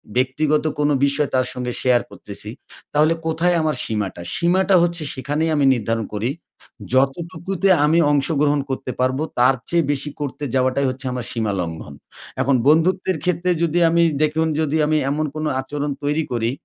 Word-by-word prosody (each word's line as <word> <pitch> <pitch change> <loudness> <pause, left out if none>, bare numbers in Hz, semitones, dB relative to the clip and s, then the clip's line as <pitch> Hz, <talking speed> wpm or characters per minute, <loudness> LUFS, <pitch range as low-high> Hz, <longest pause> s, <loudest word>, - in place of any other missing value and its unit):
ব্যক্তিগত 145 +4 +1 0.2
কোনো 145 0 +2
বিষয় 140 +1 0
তার 130 - +2
সঙ্গে 125 -1 -4
শেয়ার 125 -2 +3
করতেছি। 105 +1 -9 0.4
তাহলে 155 +2 +4
কোথায় 170 +2 +1
আমার 155 -1 0
সীমাটা? 105 -5 -3
সীমাটা 185 +3 +2
হচ্ছে 170 -2 -1
সেখানেই 145 +5 -2
আমি 145 - +2
নির্ধারণ 115 -1 -2
করি। 110 +5 -1 0.6
যতটুকুতে 170 +8 0 0.2
আমি 165 +3 +3
অংশগ্রহণ 145 0 +2
করতে 130 -1 -3
পারবো 130 +4 +1 0.2
তার 130 +2 +5
চেয়ে 170 -3 +2
বেশি 145 +1 -2
করতে 145 0 -5
যাওয়াটাই 130 +1 +1
হচ্ছে 130 +1 -5
আমার 125 -1 -4
সীমালঙ্ঘন। 90 -10 -3 0.5
এখন 135 0 +2
বন্ধুত্বের 180 +3 +3
ক্ষেত্রে 180 0 0
যদি 170 +1 +1
আমি 170 +1 +3 0.2
দেখুন 160 +1 +1
যদি 155 0 0
আমি 155 +1 +2
এমন 155 +2 -1
কোনো 155 0 -2
আচরণ 145 +2 -4
তৈরি 150 +2 0
করি, 115 -1 0
145 Hz, 155 wpm, -21 LUFS, 130-160 Hz, 0.6 s, তার